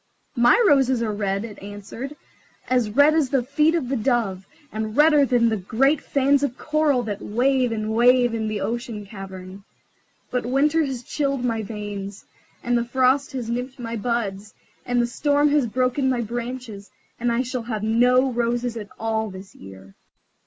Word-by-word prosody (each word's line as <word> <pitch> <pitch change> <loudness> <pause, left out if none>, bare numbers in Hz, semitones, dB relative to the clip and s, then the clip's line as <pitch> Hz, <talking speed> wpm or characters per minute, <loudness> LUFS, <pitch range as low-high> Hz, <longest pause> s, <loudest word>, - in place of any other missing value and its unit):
"My 240 - +5
roses 260 -6 +3
are 215 -2 -1
red," 200 0 -2
it 215 -3 -10
answered, 205 +8 -8 0.5
"as 250 -4 +1
red 285 +8 +5
as 310 -5 +2
the 265 -2 +1
feet 300 +5 +2
of 305 -7 -1
the 270 - -1
dove, 220 -6 -1 0.2
and 215 0 -4
redder 300 -1 +6
than 245 -2 +3
the 220 - 0
great 270 +10 +1
fans 275 0 +2
of 270 -3 -2
coral 305 -4 +1
that 205 -3 -5
wave 250 +2 +1
and 215 -1 -2
wave 245 +1 +4
in 220 -1 -2
the 215 -2 -3
ocean 230 -3 -4
cavern. 195 -1 -10 0.7
But 250 - 0
the 240 - -6
winter 295 +5 +2
has 265 -4 -4
chilled 275 -1 -2
my 225 -2 -1
veins, 205 -2 -7 0.4
and 245 0 +1
the 235 - +2
frost 260 +3 +1
has 250 -4 -4
nipped 250 +3 -4
my 230 -2 -5
buds, 215 -3 -3 0.3
and 245 0 +1
the 240 - +3
storm 290 +4 +1
has 290 -4 +2
broken 255 +3 0
my 250 -2 0
branches, 235 -2 -6 0.3
and 240 0 0
I 235 +2 +1
shall 255 0 -4
have 220 -2 -4
no 250 +4 +3
roses 240 0 -1
at 210 -2 -7
all 220 -1 -1
this 190 +1 -11
year." 95 0 -13
240 Hz, 180 wpm, -23 LUFS, 215-265 Hz, 0.7 s, redder